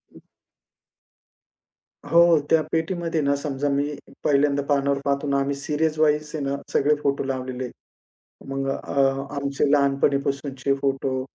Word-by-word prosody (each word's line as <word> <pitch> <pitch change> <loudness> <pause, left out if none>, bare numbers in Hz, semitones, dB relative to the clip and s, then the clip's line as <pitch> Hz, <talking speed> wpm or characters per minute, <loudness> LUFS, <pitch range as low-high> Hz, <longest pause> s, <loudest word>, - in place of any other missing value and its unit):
हं. - - -13 1.9
हो. 170 -1 +5
त्या 160 - +5
पेटीमध्ये 165 -1 -1
ना 140 0 +2
समजा 140 0 -2
मी 145 +1 0 0.3
पहिल्यांदा 140 -1 +2
पानावर 140 -1 +1
पाहतो 140 +1 0
ना, 140 0 +1
आम्ही 140 0 -1
सीरीजवाईज 150 +1 0
आहे 145 - -3
ना, 140 0 -1 0.2
सगळे 150 +2 +3
फोटो 140 0 +1
लावलेले 130 -1 -4
आहेत. 125 - -6 0.8
मग 135 0 -2
अ, 140 0 -1 0.3
आमचे 140 0 0
लहानपणीपासूनचे 140 -1 +1
फोटो 135 -1 -1
140 Hz, 125 wpm, -24 LUFS, 140-150 Hz, 1.9 s, हो